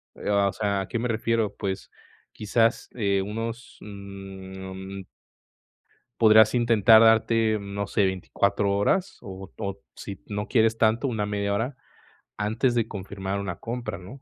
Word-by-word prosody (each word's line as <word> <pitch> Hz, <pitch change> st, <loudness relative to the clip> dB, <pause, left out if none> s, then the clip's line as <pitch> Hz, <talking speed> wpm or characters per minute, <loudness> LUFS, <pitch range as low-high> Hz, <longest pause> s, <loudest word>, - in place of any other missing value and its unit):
eh, -, -, -5 dB
o 100 Hz, -1 st, +3 dB
sea, 100 Hz, -2 st, -1 dB
¿a 95 Hz, -, -5 dB
qué 115 Hz, -, -3 dB
me 120 Hz, +1 st, -2 dB
refiero? 115 Hz, -2 st, 0 dB
Pues 95 Hz, -1 st, -4 dB, 0.4 s
quizás, 115 Hz, +3 st, +1 dB
eh, 100 Hz, -4 st, +1 dB
unos, 115 Hz, +4 st, -5 dB
mm 95 Hz, -1 st, -8 dB, 1.2 s
podrás 110 Hz, 0 st, +7 dB
intentar 115 Hz, -2 st, +6 dB
darte, 110 Hz, -1 st, +4 dB
mm, 100 Hz, 0 st, -8 dB
no 100 Hz, -1 st, -2 dB
sé, 100 Hz, -, +1 dB
24 100 Hz, +1 st, 0 dB
horas 140 Hz, -, +1 dB
o 95 Hz, -1 st, -9 dB
o 100 Hz, -2 st, -4 dB, 0.2 s
si 100 Hz, -2 st, -8 dB
no 105 Hz, +1 st, -4 dB
quieres 115 Hz, -2 st, +3 dB
tanto, 115 Hz, +5 st, +2 dB
una 110 Hz, -4 st, -1 dB
media 100 Hz, 0 st, -1 dB
hora 115 Hz, +6 st, -2 dB, 0.6 s
antes 110 Hz, +4 st, 0 dB
de 115 Hz, -2 st, +1 dB
confirmar 95 Hz, -1 st, -5 dB
una 95 Hz, -3 st, -4 dB
compra, 120 Hz, -2 st, -5 dB
¿no? 100 Hz, +10 st, -11 dB
105 Hz, 150 wpm, -25 LUFS, 100-115 Hz, 1.2 s, podrás